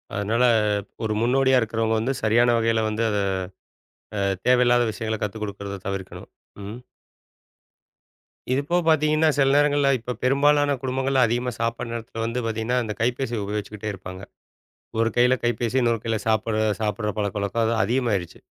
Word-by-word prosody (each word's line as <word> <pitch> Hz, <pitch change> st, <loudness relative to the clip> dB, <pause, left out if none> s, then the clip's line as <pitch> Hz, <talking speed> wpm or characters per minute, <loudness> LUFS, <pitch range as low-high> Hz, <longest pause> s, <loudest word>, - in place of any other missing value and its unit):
அதனால 110 Hz, +5 st, 0 dB, 0.6 s
ஒரு 110 Hz, -1 st, 0 dB
முன்னோடியா 130 Hz, +2 st, +3 dB
இருக்கிறவங்க 115 Hz, 0 st, 0 dB
வந்து 130 Hz, +5 st, -1 dB
சரியான 120 Hz, +2 st, +4 dB
வகையில 115 Hz, -1 st, +1 dB
வந்து 110 Hz, +2 st, -1 dB
அதை 105 Hz, -1 st, 0 dB, 1.0 s
ஆ, -, -, -1 dB, 0.3 s
தேவையில்லாத 120 Hz, -1 st, +4 dB
விஷயங்களை 110 Hz, 0 st, -3 dB
கத்துக்கொடுக்கிறத 100 Hz, -2 st, -5 dB
தவிர்க்கணும். 95 Hz, -1 st, -6 dB, 0.3 s
ம். 105 Hz, +3 st, -6 dB, 1.8 s
இது 130 Hz, -, +2 dB
இப்போ 175 Hz, +4 st, 0 dB
பாத்தீங்கன்னா 155 Hz, 0 st, +3 dB
சில 135 Hz, -1 st, +4 dB
நேரங்கள்ல, 145 Hz, -1 st, +3 dB
இப்ப 125 Hz, +2 st, -5 dB
பெரும்பாலான 145 Hz, +2 st, +3 dB
குடும்பங்கள்ல 130 Hz, 0 st, +1 dB
அதிகமா 120 Hz, +2 st, -1 dB
சாப்பிட 115 Hz, +1 st, -2 dB
நேரத்தில 115 Hz, -1 st, -6 dB
வந்து 115 Hz, +2 st, -2 dB
பாத்தீங்கன்னா, 115 Hz, +3 st, -1 dB
அந்த 105 Hz, -1 st, -4 dB
கைப்பேசி 120 Hz, 0 st, -1 dB
உபயோகிச்சுக்கிட்டே 105 Hz, +1 st, -4 dB
இருப்பாங்க. 95 Hz, 0 st, -9 dB, 0.8 s
ஒரு 115 Hz, 0 st, +2 dB
கையில 125 Hz, +1 st, +4 dB
கைப்பேசி, 120 Hz, +1 st, 0 dB
இன்னொரு 115 Hz, -2 st, +1 dB
கையில 110 Hz, -1 st, 0 dB
சாப்பிடுற 110 Hz, 0 st, +1 dB, 0.2 s
சாப்பிடுற 105 Hz, 0 st, -1 dB
பழக்கவழக்கங்கள் 105 Hz, +2 st, -1 dB
அது -, -, 0 dB
அதிகமாயிருச்சு. 115 Hz, -8 st, -1 dB
115 Hz, 135 wpm, -24 LUFS, 110-125 Hz, 1.8 s, சரியான